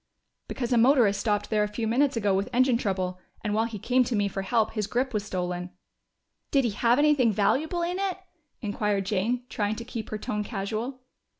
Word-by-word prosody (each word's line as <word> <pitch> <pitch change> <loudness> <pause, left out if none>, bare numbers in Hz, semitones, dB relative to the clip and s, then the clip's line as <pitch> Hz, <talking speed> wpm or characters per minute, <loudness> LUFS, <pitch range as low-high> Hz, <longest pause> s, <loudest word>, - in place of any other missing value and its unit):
"Because 245 -1 -2
a 235 - +4
motorist 235 -5 +4
stopped 205 -1 -1
there 215 -1 +3
a - - 0
few 210 +2 -3
minutes 260 +3 +2
ago 205 -3 +2
with 195 +4 0
engine 255 0 +3
trouble, 185 -4 -2 0.2
and 210 - -1
while 220 +2 +2
he 230 -2 -5
came 255 +5 +2
to 235 - -1
me 205 -1 +2
for 195 0 -3
help 220 +3 +1
his 215 -3 -2
grip 255 +2 -1
was 210 -2 0
stolen." 180 -2 -3 0.8
"Did 275 -3 +3
it 225 - 0
have 235 +3 +3
anything 290 -5 +4
valuable 310 - +1
in 355 +2 -2
it?" 390 -2 -1 0.4
inquired 205 -2 -1
Jane, 220 +6 0
trying 210 -2 -1
to 230 +1 -7
keep 230 -2 -6
her 215 - -3
tone 210 0 -3
casual. 220 +5 -4
220 Hz, 205 wpm, -27 LUFS, 205-250 Hz, 0.8 s, a